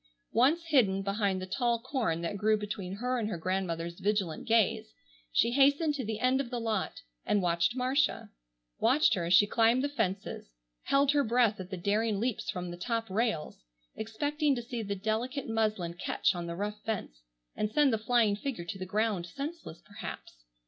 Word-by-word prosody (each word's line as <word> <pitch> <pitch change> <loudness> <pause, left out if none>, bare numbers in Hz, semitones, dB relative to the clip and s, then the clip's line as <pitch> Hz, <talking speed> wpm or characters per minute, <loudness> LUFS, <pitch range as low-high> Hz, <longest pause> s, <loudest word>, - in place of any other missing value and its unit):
Once 285 +9 +3
hidden 200 -10 +3
behind 195 -1 0
the 185 - -4
tall 235 +4 0
corn 230 - -1
that 170 +4 -3
grew 215 +2 +2
between 205 -3 -5
her 250 +4 -1
and 215 -2 -2
her 190 - -3
grandmother's 170 -1 -2
vigilant 200 -4 -1
gaze, 220 - +2 0.4
she 235 - +3
hastened 285 +4 +4
to 280 -3 -3
the 220 -1 -3
end 255 +2 +2
of 255 - -6
the 245 -1 -3
lot 220 -4 -2 0.2
and 205 -2 +1
watched 170 +6 +1
Marcia; 265 +3 0 0.5
watched 260 +7 +4
her 175 -3 -1
as 170 - +1
she 205 - +7
climbed 230 +4 +3
the - - +2
fences, 200 - -3 0.3
held 275 0 +4
her 290 -1 +3
breath 230 -3 +2
at 185 -1 -7
the 190 - -5
daring 205 +3 0
leaps 240 0 -2
from 180 -3 -3
the 175 - -7
top 230 +4 -2
rails, 195 - -1 0.3
expecting 290 +7 0
to 240 - -4
see 235 0 -4
the 200 -2 -3
delicate 225 +7 -2
muslin 215 -6 0
catch 175 - 0
on 175 -1 -5
the 170 - -4
rough 210 +3 -4
fence 195 - -4 0.3
and 210 - -1
send 285 0 +4
the 220 - +1
flying 220 -2 +3
figure 215 -5 -4
to 190 +3 -6
the 185 - -5
ground 205 -3 0
senseless 280 - -7
perhaps. 205 - -8
220 Hz, 190 wpm, -30 LUFS, 190-250 Hz, 0.5 s, she